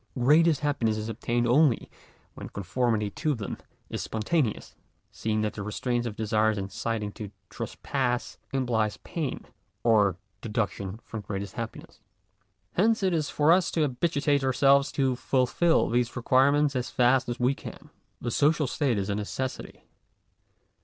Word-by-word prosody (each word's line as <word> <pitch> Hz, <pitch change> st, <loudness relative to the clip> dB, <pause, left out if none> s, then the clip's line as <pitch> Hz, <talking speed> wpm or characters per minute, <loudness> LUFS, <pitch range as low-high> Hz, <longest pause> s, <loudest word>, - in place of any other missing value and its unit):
Greatest 150 Hz, +4 st, +4 dB
happiness 125 Hz, -7 st, 0 dB
is 110 Hz, +1 st, -4 dB
obtained 120 Hz, +2 st, -1 dB
only 130 Hz, 0 st, +3 dB, 0.5 s
when -, -, -8 dB
conformity 105 Hz, +2 st, -1 dB
to 150 Hz, +6 st, -1 dB
them 105 Hz, -4 st, -5 dB, 0.3 s
is -, -, -4 dB
spon 110 Hz, -1 st, -4 dB
taneous; 140 Hz, -7 st, 0 dB, 0.4 s
seeing 110 Hz, -1 st, -1 dB
that 105 Hz, 0 st, -1 dB
the 100 Hz, -, -6 dB
restraint 120 Hz, +3 st, -2 dB
of 105 Hz, -, -5 dB
desires 110 Hz, 0 st, +1 dB
inciting 105 Hz, +2 st, -3 dB
to 105 Hz, 0 st, -7 dB, 0.2 s
trespass 125 Hz, -3 st, -3 dB
implies 120 Hz, -6 st, 0 dB
pain, 155 Hz, -6 st, -4 dB, 0.4 s
or 105 Hz, -6 st, +4 dB, 0.2 s
deduction 105 Hz, -3 st, -3 dB
from 110 Hz, -, -6 dB
greatest 100 Hz, -1 st, -5 dB
happiness. 115 Hz, -1 st, -7 dB, 0.7 s
Hence 220 Hz, +3 st, +2 dB
it 185 Hz, -2 st, +2 dB
is 155 Hz, -3 st, 0 dB
for 150 Hz, +2 st, +3 dB
us 180 Hz, +1 st, +4 dB
to 165 Hz, -, -1 dB
habituate 145 Hz, 0 st, +1 dB
ourselves 140 Hz, +1 st, +4 dB
to 135 Hz, -2 st, +1 dB
fulfil 130 Hz, +7 st, +2 dB
these 120 Hz, 0 st, 0 dB
requirements 140 Hz, +3 st, +3 dB
as 125 Hz, -1 st, -1 dB
fast 125 Hz, +1 st, +3 dB
as 120 Hz, -, -3 dB
we 125 Hz, +2 st, +3 dB
can. -, -, -11 dB, 0.3 s
The 120 Hz, -, -3 dB
social 150 Hz, +4 st, +3 dB
state 130 Hz, -3 st, 0 dB
is 100 Hz, -1 st, -1 dB
a 105 Hz, -, -1 dB
necessity. 105 Hz, +6 st, -5 dB
120 Hz, 145 wpm, -27 LUFS, 110-140 Hz, 0.7 s, Greatest